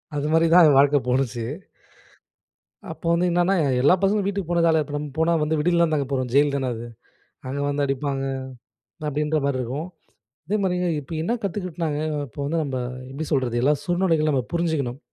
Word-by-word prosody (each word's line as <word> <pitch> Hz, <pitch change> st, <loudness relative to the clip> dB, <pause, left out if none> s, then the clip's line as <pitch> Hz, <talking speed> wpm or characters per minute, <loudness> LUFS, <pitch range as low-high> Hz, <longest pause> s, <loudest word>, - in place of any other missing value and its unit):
அது 145 Hz, +1 st, -1 dB
மாதிரி 165 Hz, +1 st, +4 dB
தான் 175 Hz, -2 st, +8 dB
என் 145 Hz, -, +4 dB
வாழ்க்கை 140 Hz, +1 st, +5 dB
போனுச்சு. 125 Hz, -2 st, 0 dB, 1.5 s
அப்ப -, -, -14 dB
வந்து 175 Hz, +2 st, +2 dB
என்னன்னா 175 Hz, +3 st, +2 dB, 0.3 s
எல்லா 145 Hz, +6 st, +6 dB
பசங்களும் 200 Hz, 0 st, +2 dB
வீட்டுக்கு 195 Hz, -4 st, -3 dB
போன 170 Hz, 0 st, +2 dB
காலத்ல 160 Hz, -2 st, +4 dB
இப்ப 145 Hz, -, -8 dB
நம்ம 150 Hz, 0 st, -4 dB
போனா 165 Hz, +1 st, +3 dB
வந்து 155 Hz, +1 st, 0 dB
விடுதியிலதான் 170 Hz, 0 st, +2 dB
தங்க 140 Hz, -3 st, 0 dB
போறோம் 130 Hz, -2 st, -1 dB
ஜெயில் 145 Hz, +1 st, +4 dB
தானே 135 Hz, -2 st, -1 dB
அது. 115 Hz, +1 st, -7 dB, 0.6 s
அங்கே 140 Hz, +2 st, -3 dB
வந்து 145 Hz, 0 st, 0 dB
அடிப்பாங்க 135 Hz, 0 st, -2 dB, 0.8 s
அப்டின்ற 150 Hz, +1 st, 0 dB
மாதிரி 140 Hz, -2 st, 0 dB
இருக்கும். 140 Hz, +8 st, -4 dB, 0.6 s
அதே 210 Hz, -, 0 dB
மாதிரிங்க 180 Hz, -1 st, 0 dB
இப்ப 145 Hz, +4 st, -12 dB
என்ன 230 Hz, +8 st, 0 dB
கத்துக்க்கிட்டனாங்க 170 Hz, -6 st, -3 dB, 0.3 s
இப்ப 115 Hz, -, -18 dB
வந்து 165 Hz, +3 st, -1 dB
நம்ம 135 Hz, -3 st, -3 dB, 0.3 s
எப்டி 145 Hz, +4 st, -5 dB
சொல்றது 120 Hz, -3 st, +1 dB
எல்லா 145 Hz, +3 st, +4 dB
சூழ்நிலைகளும் 175 Hz, -4 st, +1 dB
நம்ம 130 Hz, -2 st, +1 dB
புரிஞ்சுக்கணும். 155 Hz, -7 st, -1 dB
150 Hz, 175 wpm, -23 LUFS, 140-170 Hz, 1.5 s, தான்